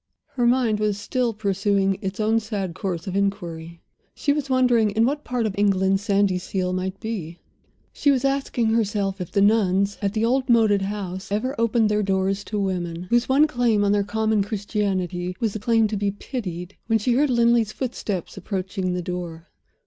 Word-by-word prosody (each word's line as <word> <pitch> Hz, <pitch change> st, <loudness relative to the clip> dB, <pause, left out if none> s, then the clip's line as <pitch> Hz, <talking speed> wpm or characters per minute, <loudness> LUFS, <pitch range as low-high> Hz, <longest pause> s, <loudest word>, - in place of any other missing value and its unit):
Her 245 Hz, -3 st, 0 dB
mind 240 Hz, -4 st, +2 dB
was 210 Hz, -1 st, 0 dB
still 245 Hz, +3 st, -1 dB
pursuing 200 Hz, -2 st, 0 dB
its 195 Hz, +2 st, -4 dB
own 220 Hz, +1 st, +2 dB
sad 205 Hz, -5 st, -4 dB
course 175 Hz, -1 st, -4 dB
of 190 Hz, -1 st, -4 dB
inquiry; 170 Hz, -4 st, -3 dB, 0.3 s
she 285 Hz, -, +1 dB
was 290 Hz, -2 st, -3 dB
wondering 250 Hz, -4 st, +3 dB
in 220 Hz, +3 st, +2 dB
what 290 Hz, +3 st, -1 dB
part 245 Hz, -2 st, -1 dB
of 210 Hz, -, -1 dB
England 195 Hz, -1 st, +2 dB
Sandyseal 190 Hz, -2 st, 0 dB
might 185 Hz, +1 st, -3 dB
be; 180 Hz, -7 st, -5 dB, 0.6 s
she 285 Hz, -, +1 dB
was 275 Hz, -1 st, +2 dB
asking 270 Hz, -4 st, 0 dB
herself 205 Hz, -3 st, 0 dB
if 180 Hz, -, -6 dB
the 200 Hz, -, +3 dB
Nuns 200 Hz, -2 st, +2 dB
at 200 Hz, -1 st, -1 dB
the 220 Hz, 0 st, +1 dB
old 260 Hz, +2 st, +1 dB
moated 220 Hz, -4 st, +4 dB
house 195 Hz, -1 st, -5 dB
ever 220 Hz, +6 st, -1 dB
opened 230 Hz, -1 st, +3 dB
their 210 Hz, 0 st, +1 dB
doors 195 Hz, 0 st, 0 dB
to 210 Hz, -, -3 dB
women, 175 Hz, -3 st, -2 dB
whose 240 Hz, +1 st, +2 dB
one 280 Hz, +3 st, +5 dB
claim 240 Hz, -7 st, +1 dB
on 200 Hz, -, +2 dB
their 205 Hz, 0 st, +2 dB
common 220 Hz, +1 st, 0 dB
Christianity 195 Hz, -4 st, -2 dB
was 225 Hz, -4 st, 0 dB
the 215 Hz, -, -4 dB
claim 225 Hz, +1 st, +3 dB
to 215 Hz, -, -2 dB
be 200 Hz, 0 st, 0 dB
pitied 190 Hz, -4 st, -6 dB
when 225 Hz, -1 st, +3 dB
she 235 Hz, +3 st, 0 dB
heard 285 Hz, +4 st, +3 dB
Linley's 235 Hz, -2 st, +3 dB
footsteps 205 Hz, -8 st, -4 dB
approaching 190 Hz, -2 st, -3 dB
the 180 Hz, -, -3 dB
door. 175 Hz, -1 st, -6 dB
205 Hz, 185 wpm, -23 LUFS, 190-230 Hz, 0.6 s, one